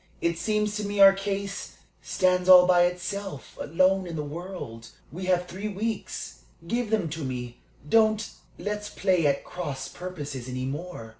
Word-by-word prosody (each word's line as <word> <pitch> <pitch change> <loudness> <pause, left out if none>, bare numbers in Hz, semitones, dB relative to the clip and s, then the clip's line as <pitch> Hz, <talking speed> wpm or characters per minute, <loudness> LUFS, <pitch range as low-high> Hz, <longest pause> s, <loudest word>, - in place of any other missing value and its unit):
"It 170 0 0
seems 210 -1 0
to 210 - -3
me 205 0 -3
our 195 0 +10
case 195 0 -4 0.3
stands 180 0 +1
all 180 -1 +10
by 175 -1 +5
itself, 180 -2 -4
alone 185 +4 +2
in 170 - -5
the 150 - -2
world. 150 -7 -7 0.2
We 185 +4 -6
have 180 -1 +2
three 190 +4 -5
weeks 210 - -4 0.3
give 235 +3 -1
them 210 -6 +1
to 155 0 -5
me. 125 -2 -5 0.3
Don't 215 +3 +3 0.3
let's 210 0 -4
play 185 -6 +2
at 140 -1 +1
cross 145 -7 -5
purposes 145 -8 -6
any 130 0 -3
more. 145 -4 -6
180 Hz, 160 wpm, -27 LUFS, 150-200 Hz, 0.3 s, our